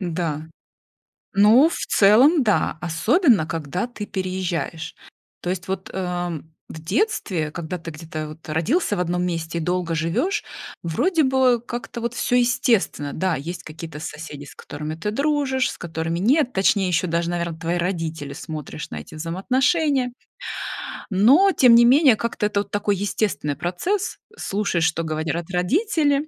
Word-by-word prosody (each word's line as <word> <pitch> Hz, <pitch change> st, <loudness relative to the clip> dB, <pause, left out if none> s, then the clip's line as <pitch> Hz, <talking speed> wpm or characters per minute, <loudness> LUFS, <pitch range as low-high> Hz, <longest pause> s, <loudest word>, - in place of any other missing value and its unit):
Да. 165 Hz, -4 st, -2 dB, 0.9 s
Ну, 215 Hz, +9 st, +6 dB
в 335 Hz, -, -4 dB
целом, 255 Hz, -, +5 dB
да. 210 Hz, -7 st, +1 dB
Особенно 205 Hz, -, +3 dB
когда 165 Hz, -, -3 dB
ты 230 Hz, -4 st, -7 dB
переезжаешь. 185 Hz, -3 st, -3 dB, 0.5 s
То 180 Hz, -, -2 dB
есть 185 Hz, -1 st, -4 dB
вот, 190 Hz, 0 st, -4 dB
э, 175 Hz, -3 st, -3 dB, 0.3 s
в 160 Hz, -, -9 dB
детстве, 180 Hz, -, 0 dB
когда 170 Hz, +2 st, -5 dB
ты 165 Hz, 0 st, -7 dB
где-то 155 Hz, -1 st, -6 dB
вот 155 Hz, +1 st, -12 dB
родился 205 Hz, -, +1 dB
в 180 Hz, -, -2 dB
одном 180 Hz, 0 st, 0 dB
месте 165 Hz, -1 st, -3 dB
и -, -, -2 dB
долго 175 Hz, 0 st, -1 dB
живешь, 165 Hz, -, 0 dB, 0.4 s
вроде 315 Hz, -, +1 dB
бы 260 Hz, -2 st, +3 dB
как-то 240 Hz, 0 st, -6 dB
вот 235 Hz, +1 st, -3 dB
всё 245 Hz, +1 st, +1 dB
естественно. 240 Hz, -, +1 dB
Да, 185 Hz, 0 st, 0 dB
есть 170 Hz, +6 st, -6 dB
какие-то 155 Hz, -1 st, -8 dB
соседи, 150 Hz, -2 st, -7 dB
с 145 Hz, -, -13 dB
которыми 150 Hz, +2 st, -6 dB
ты 165 Hz, +6 st, -3 dB
дружишь, 275 Hz, 0 st, +1 dB
с -, -, -9 dB
которыми 165 Hz, 0 st, -3 dB
нет, 250 Hz, -, +3 dB
точнее, 195 Hz, 0 st, +2 dB
ещё 180 Hz, +1 st, +1 dB
даже, 170 Hz, 0 st, 0 dB
наверно, 170 Hz, -2 st, -3 dB
твои 165 Hz, +1 st, -1 dB
родители, 165 Hz, -5 st, -3 dB
смотришь 155 Hz, -1 st, -7 dB
на -, -, -6 dB
эти 75 Hz, -, -12 dB
взаимоотношения. 255 Hz, -, +1 dB, 1.0 s
Но 265 Hz, -, +5 dB
тем 250 Hz, -8 st, +6 dB
не 235 Hz, 0 st, +7 dB
менее 265 Hz, 0 st, +6 dB
как-то 235 Hz, -2 st, -2 dB
это 205 Hz, -1 st, 0 dB
вот -, -, -10 dB
такой 205 Hz, 0 st, +1 dB
естественный 195 Hz, -7 st, -1 dB
процесс: 365 Hz, -, -2 dB, 0.2 s
слушаешь, 195 Hz, -5 st, 0 dB
что 160 Hz, +1 st, 0 dB
говорят 160 Hz, +1 st, -3 dB
родители, 290 Hz, -, +1 dB
180 Hz, 155 wpm, -22 LUFS, 165-245 Hz, 1.0 s, не